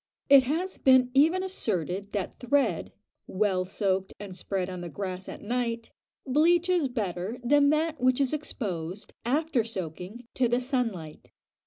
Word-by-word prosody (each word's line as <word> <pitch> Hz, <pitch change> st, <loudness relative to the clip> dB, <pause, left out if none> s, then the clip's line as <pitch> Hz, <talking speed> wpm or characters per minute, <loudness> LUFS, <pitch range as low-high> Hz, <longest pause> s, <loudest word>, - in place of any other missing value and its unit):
It 280 Hz, -1 st, +9 dB
has 340 Hz, +8 st, -2 dB
been 260 Hz, -1 st, +5 dB
even 325 Hz, +7 st, +4 dB
asserted 200 Hz, -, -2 dB
that 200 Hz, -3 st, -3 dB
thread, 260 Hz, -1 st, +1 dB, 0.4 s
well 190 Hz, -2 st, 0 dB
soaked 190 Hz, 0 st, -1 dB
and 200 Hz, -3 st, -8 dB
spread 185 Hz, 0 st, -2 dB
on 185 Hz, -1 st, -6 dB
the 175 Hz, -, -6 dB
grass 185 Hz, +2 st, -5 dB
at -, -, -9 dB
night, 230 Hz, 0 st, -2 dB, 0.3 s
bleaches 340 Hz, +3 st, +3 dB
better 205 Hz, -2 st, -3 dB
than 285 Hz, +3 st, +4 dB
that 310 Hz, -1 st, 0 dB
which 255 Hz, +1 st, +3 dB
is 275 Hz, 0 st, +1 dB
exposed, 195 Hz, -, -4 dB
after 285 Hz, 0 st, +1 dB
soaking, 190 Hz, +2 st, -7 dB
to 255 Hz, -, +2 dB
the 240 Hz, +1 st, +1 dB
sun 250 Hz, -2 st, 0 dB
light. 160 Hz, -5 st, -10 dB
235 Hz, 150 wpm, -28 LUFS, 190-280 Hz, 0.4 s, It